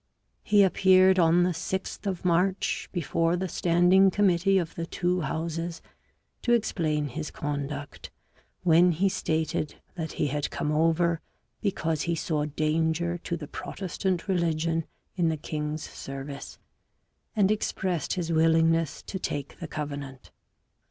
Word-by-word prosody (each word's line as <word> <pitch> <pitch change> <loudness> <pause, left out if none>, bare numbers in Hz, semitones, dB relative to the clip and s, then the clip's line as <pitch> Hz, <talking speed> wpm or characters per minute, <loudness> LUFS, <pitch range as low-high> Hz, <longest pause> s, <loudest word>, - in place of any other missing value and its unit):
He 205 -1 +5
appeared 190 0 +5
on 170 +1 +5
the 180 - +2
6th 190 +4 -4
of 185 -2 -3
March 180 +2 +1
before 165 0 0
the 185 +1 -2
standing 180 +3 +4
committee 195 -1 +3
of 170 -3 -1
the 165 0 -4
two 180 0 0
Houses 165 +3 -3 0.6
to 240 - +2
explain 155 -10 0
his 150 +4 -5
conduct, 145 0 -5 0.5
when 175 0 +5
he 185 +5 +2
stated 160 -4 -1 0.2
that 160 -3 -5
he - - 0
had 145 +1 -1
come 150 - -2
over 165 +1 +2 0.4
because 165 -7 -1
he 170 -1 0
saw 155 -2 -1
danger 160 +3 0
to 170 0 -3
the 150 -3 -8
Protestant 185 +1 -3
religion 165 -3 0 0.3
in 170 -2 +3
the 160 - -1
king's 150 0 -4
service, 135 +1 -7 0.8
and 205 -2 +3
expressed 185 -6 -1
his 170 -2 -2
willingness 165 -1 +3
to 190 - -5
take 140 -5 -4
the 170 - -5
Covenant. 140 -4 -6
165 Hz, 135 wpm, -27 LUFS, 155-180 Hz, 0.8 s, He